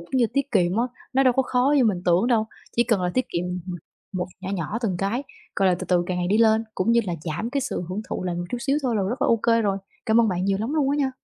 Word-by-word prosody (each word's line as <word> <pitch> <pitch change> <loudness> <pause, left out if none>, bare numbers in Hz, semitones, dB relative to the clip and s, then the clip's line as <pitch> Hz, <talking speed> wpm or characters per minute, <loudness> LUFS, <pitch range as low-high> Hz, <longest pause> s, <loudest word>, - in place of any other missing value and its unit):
cũng 170 +10 -4
như 235 - +4
tiết 275 0 0
kiệm 180 -3 +2
á, 235 - +2 0.3
nó 270 +1 +4
đâu 255 -2 +5
có 265 - +2
khó 255 +3 +2
như 260 - +4
mình 190 -5 +1
tưởng 175 +5 +3
đâu, 225 -3 +2 0.3
chỉ 235 - +5
cần 220 -5 +1
là 180 - 0
tiết 255 - +2
kiệm, 170 +1 -2 0.2
ừm, 180 -2 -4 0.4
một 180 -1 -2
nhỏ 190 0 -5
nhỏ 200 +4 -2
từng 190 -6 0
cái, 220 +8 -1 0.3
gọi 195 -1 +3
là, 180 - +3
từ - - -5
từ 180 -1 +3
càng 185 - -2
ngày 175 - 0
đi 210 +3 +3
lên 220 0 +4
cũng 195 +5 +1
như 235 - +5
là 175 - -1
giảm 175 +9 -3
cái 280 +1 0
sự 260 -8 -3
hưởng 185 +3 -3
thụ - - -3
lại 175 -1 -1
một 175 0 -3
chút 245 - -2
xíu 275 +3 +1
thôi 240 -4 0
là 200 - +1
rất 240 +9 -2
là - - +3
OK 230 0 +3
rồi. 200 -2 +1 0.3
Cảm 225 +1 +5
ơn 225 - +3
bạn 180 -1 -1
nhiều 195 0 +1
lắm 255 +8 -2
luôn 280 -3 +2
á 285 - +1
nha! 275 -2 +1
220 Hz, 310 wpm, -24 LUFS, 185-250 Hz, 0.4 s, đâu